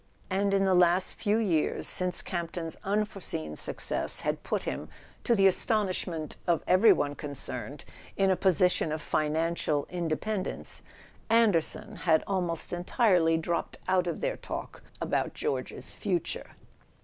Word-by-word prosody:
And 200 +1 +1
in 195 0 +3
the 190 - +3
last 180 +1 +4
few 210 0 +1
years, 180 -9 +1
since 180 -1 +1
Campton's 170 -1 -4
unforeseen 195 - -2
success - - -2
had - - -1
put - - -2
him, - - -4 0.3
to 235 - +3
the 195 -2 +4
astonishment 185 -5 0
of 170 -2 +2
every 185 +5 +6
one 145 0 +1
concerned, 145 -1 -5 0.3
in 195 -1 +3
a - - +4
position 180 -3 +2
of 155 - -2
financial 155 -1 0
independence, 180 +4 -2 0.5
"Anderson" 215 -1 +2
had 160 -3 +3
almost 180 -4 -1
en¬ 175 0 -3
tirely 180 -7 +3
dropped 170 +1 -2
out 185 -1 +2
of - - -3
their - - -1
talk - - -7 0.2
about - - -1
George's 450 - -3
future. 350 - -2
180 Hz, 135 wpm, -29 LUFS, 165-200 Hz, 0.5 s, every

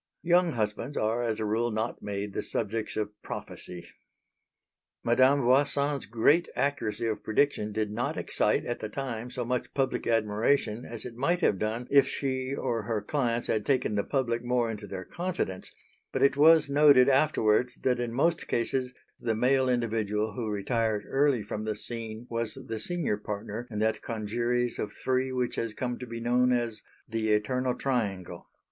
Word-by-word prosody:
Young 175 -1 +3
husbands 115 +5 -2
are 110 +3 +1
as 115 -2 -1
a 110 - -1
rule 115 +3 +1
not 110 +1 -3
made 100 0 -4
the - - -1
subjects 110 0 -2
of 105 -1 -1
prophecy. 90 -1 -7 1.2
Madame 130 +4 +4
Voisin's 140 +2 +2
great 130 - +3
accuracy 120 -6 -1
of 110 -2 -2
prediction 110 -2 +1
did 105 0 -1
not 125 +8 -2
excite - - +1
at 120 - -3
the 110 - -5
time 120 -1 -4
so 125 -1 -4
much 125 0 -2
public 135 -1 0
admiration 115 +2 +1
as 115 -2 -7
it 125 - -6
might 170 +9 +1
have 100 - +2
done 115 +3 -2
if 140 -1 +6
she 130 -1 -2
or 115 -4 -1
her 110 0 -1
clients 120 +1 -1
had 110 -1 0
taken 130 -4 +1
the 100 -1 +1
public 120 -3 -1
more 120 -2 +1
into 105 -1 -7
their 95 -1 -6
confidence; 170 - -4 0.4
but - - 0
it 140 - +4
was 160 +2 +6
noted 140 -2 +6
afterwards 125 -4 +3
that 125 -2 +2
in 120 -1 -2
most 160 +7 +1
cases 125 +2 -1 0.3
the 115 -2 -1
male 130 +3 +3
individual 110 -3 0
who 110 0 -3
retired 105 +1 0
early 135 -4 +2
from 105 - -5
the 110 -1 -2
scene 115 +1 -7
was 115 -2 -3
the 110 -1 -4
senior 170 -4 -1
partner 105 +3 -5
in 105 - -6
that 110 +1 +1
congeries 120 +2 -1
of 105 - -2
three 130 0 0
which 125 -1 -1
has 115 -2 -2
come 125 -1 -3
to 125 - -7
be 115 0 -6
known 125 +2 +2
as 120 -3 +2 0.3
"the 110 -1 -1
eternal 125 +4 +1
triangle." 105 -10 -2
120 Hz, 175 wpm, -28 LUFS, 110-130 Hz, 1.2 s, if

